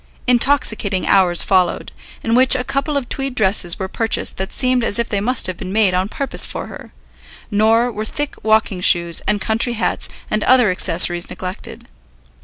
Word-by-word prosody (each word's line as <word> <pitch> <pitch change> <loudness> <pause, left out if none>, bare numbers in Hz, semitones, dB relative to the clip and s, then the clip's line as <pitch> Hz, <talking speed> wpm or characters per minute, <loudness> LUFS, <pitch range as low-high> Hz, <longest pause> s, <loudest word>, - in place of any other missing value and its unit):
Intoxicating 235 -6 +1
hours 180 -3 +3
followed, 185 -3 0 0.3
in 225 - -2
which 260 +2 +5
a 250 - -2
couple 275 +3 -2
of 265 -4 -4
tweed 270 -1 -5
dresses 190 -5 +1
were 190 - -5
purchased 225 +3 0
that 190 0 -5
seemed 255 -1 +1
as 205 - +1
if 235 0 -1
they 200 -2 -3
must 250 +4 0
have 185 -2 -4
been 185 - -8
made 205 -2 +1
on 185 +2 -1
purpose 275 +4 0
for - - -5
her; - - -12 0.6
nor 225 +3 +2
were 215 -1 -5
thick 290 +6 -5
walking 215 -4 0
shoes, 170 -2 +2
and 210 0 +1
country 225 +4 0
hats, 230 - -2 0.2
and 215 0 -1
other 250 -6 +3
accessories 175 -1 +2
neglected. 185 0 -8
215 Hz, 180 wpm, -17 LUFS, 190-245 Hz, 0.6 s, which